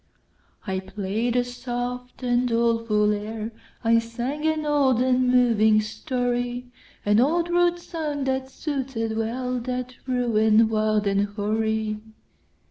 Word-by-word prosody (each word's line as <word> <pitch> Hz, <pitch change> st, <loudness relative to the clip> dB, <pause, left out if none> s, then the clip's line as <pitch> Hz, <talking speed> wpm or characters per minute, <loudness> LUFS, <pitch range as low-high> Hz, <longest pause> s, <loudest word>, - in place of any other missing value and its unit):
I 190 Hz, -2 st, -1 dB
play'd 205 Hz, +5 st, -2 dB
a 245 Hz, -, +3 dB
soft 245 Hz, +1 st, -5 dB
and 245 Hz, 0 st, +2 dB
doleful 230 Hz, -3 st, +2 dB
air,I 220 Hz, +2 st, -2 dB
sang 245 Hz, +7 st, -3 dB
an 315 Hz, -1 st, 0 dB
old 280 Hz, -5 st, +3 dB
and 255 Hz, 0 st, +3 dB
moving 230 Hz, -4 st, +4 dB
story—An 245 Hz, -2 st, -2 dB
old 335 Hz, +7 st, +2 dB
rude 350 Hz, 0 st, +3 dB
song, 310 Hz, -5 st, -4 dB
that 265 Hz, 0 st, -1 dB
suited 265 Hz, -6 st, -3 dB
wellThat 250 Hz, +2 st, -2 dB, 0.2 s
ruin 225 Hz, -3 st, +3 dB
wild 215 Hz, -1 st, +1 dB
and 200 Hz, 0 st, +2 dB
hoary. 215 Hz, +1 st, -1 dB
240 Hz, 110 wpm, -24 LUFS, 220-255 Hz, 0.2 s, moving